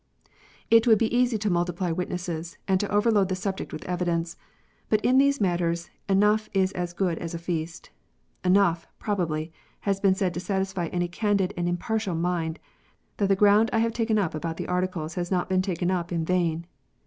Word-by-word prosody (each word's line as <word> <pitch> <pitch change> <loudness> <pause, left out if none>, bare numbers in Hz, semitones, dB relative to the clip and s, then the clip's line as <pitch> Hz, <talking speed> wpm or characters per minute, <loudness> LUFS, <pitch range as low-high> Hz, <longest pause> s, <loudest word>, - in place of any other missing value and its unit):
It 230 +1 +6
would 220 -2 +7
be 225 +2 0
easy 245 -2 +3
to 210 0 -1
multiply 175 0 0
witnesses, 175 -1 -4
and 190 -1 +3
to 205 - -2
overload 205 -2 +3
the 185 - 0
subject 190 +1 -4
with - - -7
evidence. 175 -2 -1 0.5
But 215 -1 +1
in 255 +2 +5
these 280 0 +3
matters 175 -3 0 0.2
enough 210 +2 +3
is 190 -1 +3
as 175 -2 -4
good 175 -2 -1
as 170 0 -5
a - - -2
feast. 165 -1 -4 0.5
Enough, 180 -3 +3
probably, 165 -6 -2 0.3
has 195 -1 0
been 195 -1 +3
said 190 -2 0
to 175 - -3
satisfy 190 -1 -2
any 175 +1 -1
candid 200 +1 0
and 175 0 -1
impartial 195 +2 -1
mind 165 -1 -1 0.6
that 200 -1 +1
the 195 - +5
ground 210 +3 +5
I - - +1
have 230 0 +1
taken 225 -2 +1
up 190 -6 0
about 165 +1 -4
the - - -4
Articles 180 -3 -2
has 175 0 -3
not 180 -2 0
been 185 0 +2
taken 180 -1 -1
up 175 -2 -2
in 165 -2 -1
vain. 170 -2 0
185 Hz, 190 wpm, -26 LUFS, 170-205 Hz, 0.6 s, would